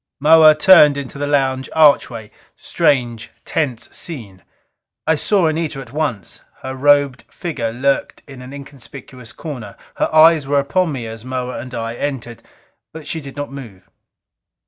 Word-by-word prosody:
Moa 155 +1 +7
turned 150 -3 +6
into 140 0 -7
the 145 - -2
lounge 135 -2 0
archway. 130 -8 +3 0.3
Strange, 120 -5 0 0.2
tense 130 -8 -2
scene. 110 - -8 0.6
I 160 - +3
saw 185 +4 +1
Anita 155 -2 -1
at 130 -2 -11
once. 140 - -3 0.2
Her 130 0 -5
robed 145 -1 +3
figure 135 -10 -4
lurked 135 +4 -1
in 135 -3 -11
an 125 +1 -10
inconspicuous 135 -3 -11
corner; 125 -10 -8 0.2
her - - 0
eyes 155 -2 +5
were 145 0 +1
upon 160 +5 0
me 130 -5 -5
as 115 0 -8
Moa 125 0 -4
and 125 0 -8
I 115 0 -4
entered, 120 -3 -5 0.5
but 160 -1 -10
she 160 - -4
did 140 -1 -10
not 145 -1 -5
move. 115 -10 -11
140 Hz, 150 wpm, -18 LUFS, 125-150 Hz, 0.6 s, Moa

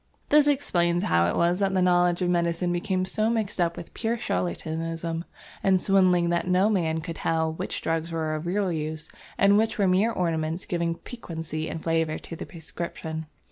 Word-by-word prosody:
This 295 0 +6
explains 175 -12 +2
how 85 0 +3
it 85 - 0
was 175 +2 +2
that 195 -1 +1
the 185 - +3
knowledge 175 0 +3
of 175 - +1
medicine 170 0 +1
became 185 +1 0
so 215 +3 0
mixed 215 -5 -1
up 170 -1 0
with 170 - -9
pure 230 +1 -1
charlatanism 165 - -3 0.4
and 190 -1 +3
swindling 180 -3 +3
that 170 +1 0
no 185 +4 +3
man 160 -5 0
could 165 0 -6
tell 160 -1 0
which - - -5
drugs 165 +1 -1
were 160 -1 -1
of 155 +2 -4
real 190 +1 0
use 155 0 -4 0.3
and 200 +1 +5
which 225 0 0
were 200 -2 +3
mere 190 +5 +3
ornaments 165 -2 -1
giving 170 -1 -1
piquancy 160 - -6
and 160 - -6
flavour 165 -1 +1
to 165 - -9
the - - -7
prescription. 160 -1 -6
170 Hz, 185 wpm, -26 LUFS, 160-190 Hz, 0.4 s, This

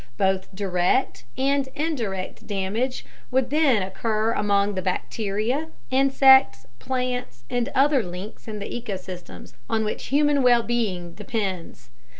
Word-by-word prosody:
Both 190 -1 +1
direct 185 - 0
and 275 0 +1
indirect 235 - -3
damage 210 +6 -2 0.2
would 260 0 +1
then 285 -9 +3
occur 215 +3 -1
among 205 -1 +1
the 190 - -2
bacteria, 215 - -2 0.2
insects, 265 - +5
plants, 250 - -3
and 245 +1 0
other 275 0 +4
links 185 +4 -8
in 215 -1 -5
the 200 - -5
ecosystems 190 -6 -7 0.2
on 220 -1 +1
which 210 - -3
human 290 0 +3
well 240 -2 +5
being 195 -8 -2
depends. 190 - -4
220 Hz, 125 wpm, -24 LUFS, 190-260 Hz, 0.2 s, insects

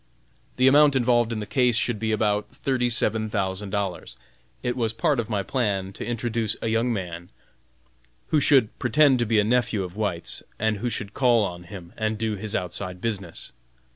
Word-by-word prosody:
The 130 +1 +4
amount 145 +1 +6
involved 120 -2 +2
in 115 - -2
the 105 - -4
case 125 +1 +2
should 115 -1 0
be 110 0 -1
about 105 -1 0
thirty 125 -3 -1
seven 110 -2 0
thousand 95 -1 -2
dollars. 100 -3 -3 0.5
It 125 -1 -1
was 115 -3 -1
part 145 +2 +1
of 115 - -3
my 100 -3 -1
plan 100 -5 -1
to - - -7
introduce 115 -2 -1
a 115 - -2
young 115 +2 +1
man, 90 -5 -5 1.0
who 155 - +3
should 135 -6 +3
pretend 135 +1 +4
to 120 - 0
be 110 -1 +3
a - - +4
nephew 115 -2 +1
of 90 0 -8
White's, 100 -6 -2 0.2
and 110 0 0
who 120 +5 -2
should 110 -2 -4
call 120 -5 +3
on 90 -2 -7
him 85 -1 -10
and 110 0 -1
do 110 -1 -1
his 105 +1 -4
outside 90 0 -3
business. 100 -6 -5
110 Hz, 190 wpm, -25 LUFS, 100-120 Hz, 1.0 s, amount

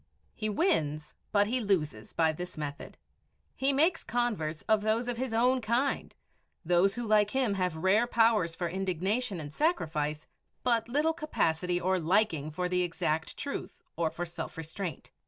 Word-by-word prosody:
He 215 -1 -3
wins, 155 - 0 0.2
but 205 -1 +4
he 245 +5 0
loses, 155 - -1
by 160 -1 +2
this 180 +2 -7
method. 145 -2 -6 0.6
He 270 +1 +2
makes 320 +5 +2
converts 215 -11 -1
of 220 -1 +3
those 220 +3 +1
of 245 -1 -2
his 260 0 -2
own 250 +3 +3
kind, 240 +5 0 0.5
those 180 +4 +3
who 240 -1 -3
like 210 -1 +4
him 255 -3 +1
have 180 -4 -1
rare 195 +8 +3
powers 225 -8 +3
for 175 - -2
indignation 190 +4 -1
and 150 -1 -7
sacrifice, 155 - 0 0.4
but 235 -2 +1
little 300 +5 +2
capacity 180 - 0
or 185 +1 +1
liking 165 -3 +1
for 180 +4 -2
the 180 0 +1
exact 160 -2 -1
truth 355 +5 -5
or 165 -2 +1
for 170 +2 -4
self 170 -1 -7
restraint. 165 0 -5
195 Hz, 160 wpm, -30 LUFS, 165-240 Hz, 0.6 s, but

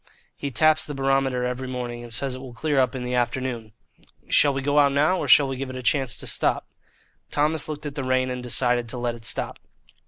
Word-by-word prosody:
"He 140 - -4
taps 155 +5 +3
the 145 - -5
barometer 135 -2 +1
every 125 +1 -3
morning, 125 -2 -5
and 120 -1 -10
says 130 +3 -1
it 130 - -7
will 130 -3 -10
clear 145 +2 0
up 130 -1 +1
in 125 - -4
the 125 0 -3
afternoon. 120 -2 -2 0.6
Shall 145 - +5
we 135 -1 -3
go 145 +1 +3
out 140 -1 +4
now, 150 +6 +3
or - - -3
shall 145 - +7
we 135 -1 -4
give 135 0 -4
it 130 - -7
a 130 - -6
chance 125 -2 +1
to - - -5
stop?" - - +1 0.6
Thomas 155 +2 0
looked 150 0 -6
at 145 - -4
the 140 -2 -4
rain 130 0 +1
and 125 0 -4
decided 120 -1 +1
to 125 - -4
let 120 -1 -2
it 115 -1 -8
stop. - - -2
130 Hz, 240 wpm, -24 LUFS, 125-140 Hz, 0.6 s, shall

